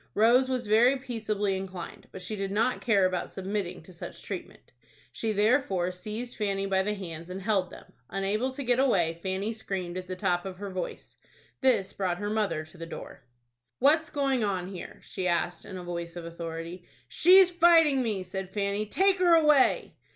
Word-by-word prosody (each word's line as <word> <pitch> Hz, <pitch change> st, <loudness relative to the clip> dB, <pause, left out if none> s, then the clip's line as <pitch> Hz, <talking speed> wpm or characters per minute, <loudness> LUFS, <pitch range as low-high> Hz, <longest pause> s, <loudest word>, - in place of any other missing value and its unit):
Rose 245 Hz, +5 st, +5 dB
was 255 Hz, -2 st, -1 dB
very 235 Hz, +6 st, +4 dB
peaceably 215 Hz, -6 st, -2 dB
inclined, 190 Hz, -2 st, -7 dB
but 190 Hz, -, -8 dB
she 215 Hz, +4 st, -4 dB
did 195 Hz, -1 st, -3 dB
not 225 Hz, +5 st, +1 dB
care 205 Hz, -5 st, +3 dB
about 185 Hz, -1 st, -1 dB
submitting 190 Hz, -3 st, -4 dB
to 185 Hz, -, -14 dB
such 170 Hz, -, -9 dB
treatment. -, -, -8 dB, 0.4 s
She 225 Hz, -, -2 dB
therefore 205 Hz, -4 st, +2 dB
seized 215 Hz, +6 st, -6 dB
Fanny 195 Hz, -2 st, -1 dB
by 190 Hz, -1 st, +2 dB
the 210 Hz, +2 st, -1 dB
hands 170 Hz, -3 st, -7 dB
and 185 Hz, +1 st, -5 dB
held 195 Hz, -2 st, 0 dB
them. -, -, -14 dB, 0.2 s
Unable 205 Hz, +6 st, -1 dB
to 280 Hz, -, -5 dB
get 245 Hz, 0 st, +2 dB
away, 175 Hz, -11 st, +2 dB
Fanny 195 Hz, +4 st, -2 dB
screamed 190 Hz, -5 st, -4 dB
at 185 Hz, -, -9 dB
the 185 Hz, -, -4 dB
top 180 Hz, -2 st, 0 dB
of 190 Hz, -1 st, -7 dB
her 200 Hz, 0 st, -6 dB
voice. 185 Hz, -1 st, -6 dB, 0.4 s
This 245 Hz, -8 st, +2 dB
brought 185 Hz, -3 st, -1 dB
her 205 Hz, +1 st, -3 dB
mother 205 Hz, -8 st, -1 dB
to 160 Hz, +2 st, -16 dB
the 165 Hz, -, -6 dB
door. -, -, -9 dB, 0.6 s
"What's 315 Hz, +4 st, +4 dB
going 275 Hz, -5 st, 0 dB
on 190 Hz, -3 st, -1 dB
here?" 180 Hz, -, -9 dB
she 185 Hz, -, -3 dB
asked, 175 Hz, 0 st, -1 dB
in 185 Hz, -, -7 dB
a 180 Hz, -, -7 dB
voice 170 Hz, -1 st, -5 dB
of 175 Hz, -1 st, -6 dB
authority. 170 Hz, +1 st, -6 dB, 0.2 s
"She's 365 Hz, -, +6 dB
fighting 330 Hz, -5 st, +5 dB
me," 210 Hz, -6 st, -1 dB
said 190 Hz, +1 st, -5 dB
Fanny. 200 Hz, +1 st, -1 dB
"Take 385 Hz, -, +3 dB
her 350 Hz, -2 st, +6 dB
away." 300 Hz, -4 st, +4 dB
200 Hz, 190 wpm, -28 LUFS, 180-245 Hz, 0.6 s, She's